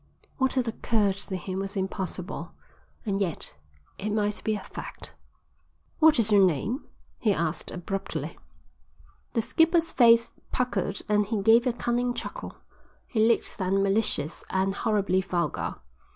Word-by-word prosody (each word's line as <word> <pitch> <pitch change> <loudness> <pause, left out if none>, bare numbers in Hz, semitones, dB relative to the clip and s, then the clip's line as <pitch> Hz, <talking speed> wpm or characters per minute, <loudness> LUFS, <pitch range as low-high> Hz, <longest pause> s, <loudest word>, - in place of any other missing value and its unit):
What 265 0 +2
had 255 -2 +1
occurred 215 -3 +1
to 195 -1 -2
him 185 +1 -4
was 195 +1 -4
impossible, 190 -1 -4 0.5
and 200 -1 -1
yet 175 -6 -2 0.5
it 210 - -2
might 210 -1 0
be 220 - +1
a - - -3
fact. - - -8 0.9
"What 315 -1 +6
is 220 -2 +3
your 200 -2 +7
name?" 190 - 0 0.3
he 215 - +2
asked 170 -3 -1
abruptly. 195 +2 -4 0.9
The 230 - +1
skipper's 330 +5 +3
face 230 -2 +5 0.2
puckered 245 -5 -1
and 210 -1 +2
he 210 -2 -1
gave 230 +4 +6
a - - +3
cunning 240 +1 0
chuckle. - - -6 0.5
He 220 -2 +2
looked 230 - +1
then 195 +1 +2
malicious 195 -6 +1
and 190 +1 +1
horribly 195 -3 +1
vulgar. 180 -2 -2
205 Hz, 140 wpm, -27 LUFS, 190-235 Hz, 0.9 s, your